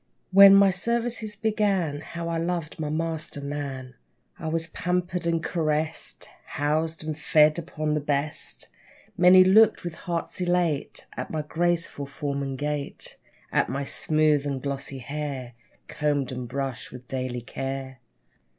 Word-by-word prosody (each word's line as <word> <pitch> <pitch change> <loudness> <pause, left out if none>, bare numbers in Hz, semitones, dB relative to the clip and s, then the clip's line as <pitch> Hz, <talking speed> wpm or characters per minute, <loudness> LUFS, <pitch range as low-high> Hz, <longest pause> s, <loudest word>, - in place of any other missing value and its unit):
When 195 +1 +10
my 195 -1 +6
services 230 +2 0
began, 200 -8 0
How 170 0 -6
I 165 0 -1
loved 170 -2 -3
my 150 -1 -2
master, 160 -1 -2
man! 140 -3 -5 0.5
I - - -5
was 165 +1 0
pampered 180 +1 -2
and 165 -1 +1
caressed, 155 -1 -2 0.2
Housed, 155 +3 -1
and 155 -1 -3
fed 155 +1 +4
upon 155 -2 -3
the 150 - +1
best. 145 +1 -2 0.5
Many 180 +1 +8
looked 210 +4 +5
with 175 -2 -4
hearts 170 +2 -4
elate 175 -5 0
At - - -5
my 155 -1 -2
graceful 170 -2 -1
form 140 0 -3
and 135 -1 -3
gait, 145 0 -2 0.4
At - - +2
my 135 +3 -2
smooth 155 0 +2
and 140 -2 -2
glossy 140 0 -4
hair 135 -2 -5 0.3
Combed 145 -3 -1
and 125 -1 -5
brushed 135 -1 -4
with 125 0 -11
daily 130 -2 -3
care. 135 +1 -5
155 Hz, 140 wpm, -26 LUFS, 140-175 Hz, 0.5 s, When